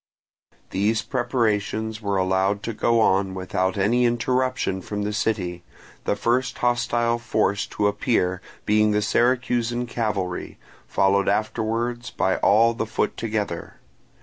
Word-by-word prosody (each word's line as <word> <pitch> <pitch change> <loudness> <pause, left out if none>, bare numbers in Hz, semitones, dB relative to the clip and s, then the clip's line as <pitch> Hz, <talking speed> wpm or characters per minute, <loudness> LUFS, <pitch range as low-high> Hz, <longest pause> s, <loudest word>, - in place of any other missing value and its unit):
These 105 +3 +1
preparations 110 -3 -1
were 100 -2 -1
allowed 95 +2 +1
to 115 - -3
go 115 +2 +2
on 95 -2 +2
without 95 +1 -1
any 115 +6 +2
interruption 125 -4 0
from 105 +2 -4
the 105 +1 -2
city, 90 -5 -1 0.4
the - - +1
first 125 +4 0
hostile 120 -1 +1
force 110 -4 0
to 105 - -2
appear 100 -3 +1 0.2
being 105 0 +3
the 105 0 +1
Syracusan 120 0 +1
cavalry, 105 -6 -3 0.3
followed 100 +1 +2
afterwards 115 +3 -1
by 95 - 0
all 115 +3 +4
the 110 -1 -3
foot 110 - -1
together. 105 -6 -3
110 Hz, 125 wpm, -24 LUFS, 100-120 Hz, 0.4 s, all